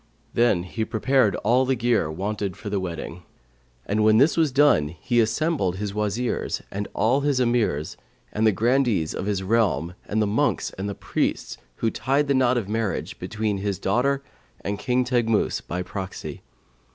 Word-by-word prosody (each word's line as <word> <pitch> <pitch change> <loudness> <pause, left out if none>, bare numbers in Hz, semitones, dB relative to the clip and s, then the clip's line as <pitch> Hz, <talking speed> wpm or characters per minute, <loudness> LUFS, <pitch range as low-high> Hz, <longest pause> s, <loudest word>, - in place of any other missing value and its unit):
Then 115 -7 +3
he 110 +5 -3
prepared 110 -1 +2
all 120 +5 +4
the 130 0 +1
gear 120 -8 +1
wanted 100 +3 -3
for 110 -6 -6
the 100 - 0
wedding; 85 -1 -5 0.6
and 105 +2 +1
when 110 0 +5
this 140 +4 +4
was 160 -4 +2
done 135 - +4
he 120 +4 +1
assembled 115 - +1
his 100 +1 -4
Wazirs 105 +3 -1
and 100 +1 -3
all 125 +6 +2
his 140 -2 +1
Emirs 115 - 0 0.4
and 110 +1 +2
the - - +5
Grandees 115 - +1
of 95 - -4
his 100 -2 -1
realm 95 - +1
and 110 - -1
the 110 - +3
monks 105 +2 0
and 100 +1 -5
priests - - -2 0.2
who 115 - 0
tied 140 +3 0
the 140 - +2
knot 130 -1 +3
of 110 -5 -2
marriage 110 -1 -2
between 110 -2 -2
his 100 -1 -2
daughter 135 +7 +1 0.4
and 100 +3 -3
King 125 0 +1
Teghmus 120 -3 +1
by 90 +1 -4
proxy. 95 0 -6
110 Hz, 170 wpm, -24 LUFS, 100-125 Hz, 0.6 s, when